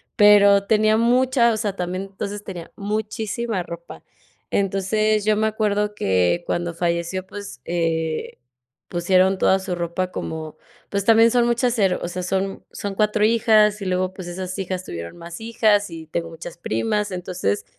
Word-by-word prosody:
Pero 200 -1 +6
tenía 215 0 +3
mucha, 245 +1 +3
o 220 - -2
sea, 205 -3 -2
también, 180 +1 -3
entonces, 205 +1 -5
tenía 175 -5 -8
muchísima 215 0 -3
ropa. 170 0 -10 0.5
Entonces, 205 +2 +1
yo 215 0 +3
me 220 +1 +1
acuerdo 210 -1 0
que 95 - +1
cuando 175 -1 -2
falleció, 170 +2 -1
pues, 200 -7 -9
eh, 165 -2 -2 0.5
pusieron 185 +2 +3
toda 190 +1 +3
su 185 -1 -4
ropa 175 +2 -2
como 160 -1 -5 0.3
pues 200 0 -1
también 225 +2 +6
son 240 0 +3
muchas, 240 0 +1
ero 190 -4 +2
o - - -3
sea, 180 +1 -5
son 195 +1 -2
son 200 -1 -5
4 210 0 +2
hijas 215 -2 +4
y - - -4
luego, 185 0 0
pues 185 -2 -8
esas 185 +2 -5
hijas 185 -1 -3
tuvieron 85 - -7
más 170 +3 -9
hijas 220 -3 +2
y 160 -1 -8
tengo 165 +1 -3
muchas 165 +1 -9
primas. 170 - -1
Entonces, 175 - -2
195 Hz, 160 wpm, -22 LUFS, 175-215 Hz, 0.5 s, Pero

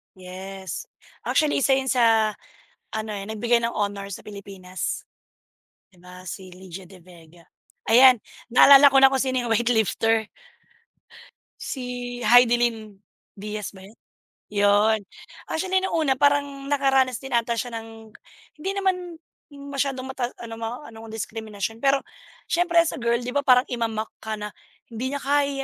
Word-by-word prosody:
Yes. 190 - -8 0.4
Actually 305 -2 +2
1 270 0 +3
'yun 265 -1 0
sa 225 -3 +3 0.6
ano, 220 0 -4
eh, 200 -1 -5
nagbigay 235 +2 +1
ng 235 - -1
honor 200 -1 -2
sa - - -8
Pilipinas. 195 -3 -6 1.0
'Di 175 - -22
ba 180 0 -13
si 185 +1 -8
Lydia 185 0 -11
De 190 - -14
Vega. 170 -1 -18 0.4
Ayan 250 +2 +7 0.3
naalala 275 +3 +8
ko 270 - +3
na 270 0 +7
kung 265 - +1
sino 260 -2 -1
'yung 235 - -3
weight 240 +1 +1
lifter. 225 -1 +1 1.4
Si 265 - -5 0.4
Hidilyn 235 -2 +3 0.4
Diaz 210 0 -6
ba 190 - -13
yun 210 +4 -17 0.6
'yun. 205 +2 +3 0.5
Actually 375 +3 0
nung 380 - -1
una 300 -5 +2
parang 285 0 +1
nakaranas 270 -3 +2
din 270 -1 -7
ata 235 0 +1
siya 240 +1 -4
ng 225 -1 -10 0.5
hindi 380 +5 -2
naman 365 -3 -1 0.3
masyadong 280 -2 -3
mata 255 -2 -3
ano 230 -1 -7
ma 230 +5 -6
anong 225 0 -11
diskriminasyon, 220 0 -5
pero 275 0 +3 0.5
siyempre 340 0 +1
as 330 - -1
a - - -8
girl, 235 0 +2
'di 250 +1 -5
ba 285 - +3
parang 255 -1 +5
ima-mock 225 -3 -3
ka 220 -1 -4
na, 210 0 -6 0.4
"Hindi 250 +4 -4
niya 285 - -4
kaya 285 +1 +2
230 Hz, 150 wpm, -24 LUFS, 210-270 Hz, 1.4 s, naalala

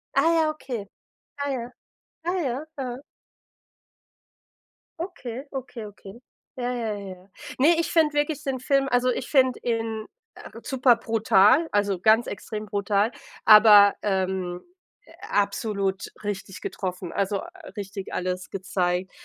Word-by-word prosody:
Ah, 280 +5 +4
ja, 320 -2 +3
okay. 255 -8 -5 0.5
Ah, 285 0 -1
ja, 245 -2 -4 0.5
ah, 355 +2 0
ja, 265 +1 -2
aha. 255 -1 -4 2.0
Okay, 270 -8 -6
okay, 250 -4 -6
okay. 205 +2 -12 0.4
Ja, 250 0 -2
ja, 225 -3 -2
ja. 190 -1 -10 0.3
Ne, 325 +5 +4
ich 335 - 0
finde 315 -3 +3
wirklich 295 +1 -1
den 270 -2 -2
Film 275 +1 +1
also 250 +1 +3
ich 250 - -2
finde 260 -3 +3
ihn, 225 -2 -2 0.3
äh, - - -11
superbrutal, 235 - +3
also 205 -2 +1
ganz 220 +3 +4
extrem 210 +1 -6
brutal, 205 +1 0 0.3
aber, 210 -2 +8
ähm, 190 -2 -1 0.6
absolut 200 -1 -1
richtig 195 -2 -5
getroffen, 180 -2 -5
also, 200 0 -1 0.4
richtig 195 -1 -6
alles 185 0 -3
gezeigt, 185 -1 -1
220 Hz, 120 wpm, -25 LUFS, 200-260 Hz, 2.0 s, aber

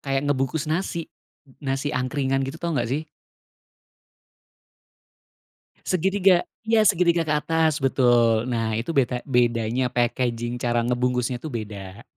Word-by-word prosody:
kayak 135 0 -1
ngebungkus 140 +2 0
nasi, 165 +1 -2 0.5
n-nasi 135 +1 -2
angkringan 135 +1 0
gitu. 135 +4 -6
Tahu 170 0 -3
nggak 120 - -1
sih? 145 +5 -1 2.8
Segitiga, 185 0 +3 0.2
ya 225 -1 +4
segitiga 175 -3 +3
ke 155 - 0
atas 160 +1 +1
betul. 120 -3 +3
Nah 115 -3 -1
itu 125 +8 -4
beta 125 -2 +1
bedanya 120 -1 +1
packaging 120 -1 -1
cara 120 -1 0
ngebungkusnya 125 0 0
tuh 155 +5 -7
beda. 105 -2 -7
130 Hz, 120 wpm, -24 LUFS, 120-155 Hz, 2.8 s, ya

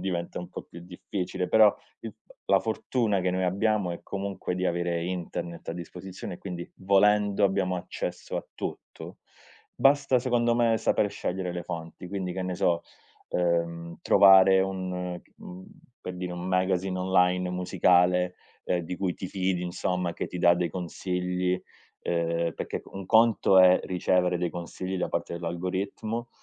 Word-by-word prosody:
diventa 85 -3 -3
un 90 -1 -7
po' - - -7
più 85 - -12
difficile 90 +1 -4
però 110 +1 +6 0.3
il - - -7
f - - -45 0.2
la - - +4
fortuna 110 -2 0
che 90 - +1
noi 95 +1 0
abbiamo 100 +1 +1
è 85 - -5
comunque 100 -2 -4
di 90 +1 -1
avere 85 -1 -1
internet 85 -1 -5
a - - -1
disposizione 90 +2 -7
e - - -12
quindi 90 -3 -7
volendo 100 +1 +3
abbiamo 95 -2 +1
accesso 90 - -5
a - - -3
tutto. - - -7 0.6
Basta 135 -2 +4
secondo 120 -1 +1
me 115 -1 +3
saper 105 - +1
scegliere 90 -1 -3
le 90 - -3
fonti 85 +2 -7
quindi 95 -1 -3
che 95 - -3
ne 90 0 -3
so, 85 -2 +1 0.5
ehm, 85 -1 -1
trovare 95 -1 +7
un, 90 -2 -3 0.2
mhmm, 90 +1 -10 0.4
per 90 - -5
dire 90 0 -4
un 90 0 -5
magazine 95 0 0
online 90 0 +2
musicale, 90 0 +2 0.3
ehm, 90 - 0
di 85 +1 -5
cui 90 -2 -1
ti 95 - -6
fidi 95 -1 -1
insomma 90 0 -2
che - - -4
ti 90 - -7
dà 85 0 +5
dei 85 0 -1
consigli, 90 +1 -2 0.4
ehm, 85 -1 0
perché - - -4
c - - -28
un 95 -1 -7
conto 110 -3 +5
è 90 0 +7
ricevere 90 0 +1
dei 90 -1 -1
consigli 90 +2 -5
da - - -1
parte - - -3
dell'algoritmo 95 +7 -3
90 Hz, 160 wpm, -27 LUFS, 90-95 Hz, 0.6 s, trovare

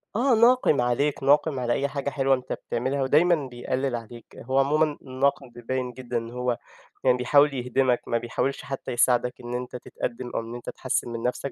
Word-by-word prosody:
آه، 245 +2 +3
ناقِم 235 - +4
عليك، 135 +4 0
ناقِم 145 0 +3
على 120 -1 0
أي 140 - 0
حاجة 140 0 -3
حلوة 135 -1 +2
أنت 130 0 -5
بتعملها 130 +4 -2
ودايمًا 160 +6 +4
بيقلِّل 130 +1 -2
عليك. 115 0 -9 0.2
هو 130 +3 0
عمومًا 150 +2 +2
الناقِم 130 0 -1
بيبيّن 125 +2 -4
جدًا 125 -2 -4
إن 115 0 -5
هو 125 -1 -1 0.5
يعني 125 -1 +4
بيحاول 140 +4 +4
يهدمك 125 0 +1
ما 115 - +1
بيحاولش 120 +4 -2
حتّى 135 -1 -5
يساعدك 125 0 +2
إن 120 0 -6
أنت 125 0 -4
تتقدِّم 120 0 -5
أو - - +1 0.2
أنت 120 - -7
تحسِّن 130 -2 -2
من 115 -1 -5
نََفسك، 140 - -6
130 Hz, 180 wpm, -25 LUFS, 120-140 Hz, 0.5 s, ناقِم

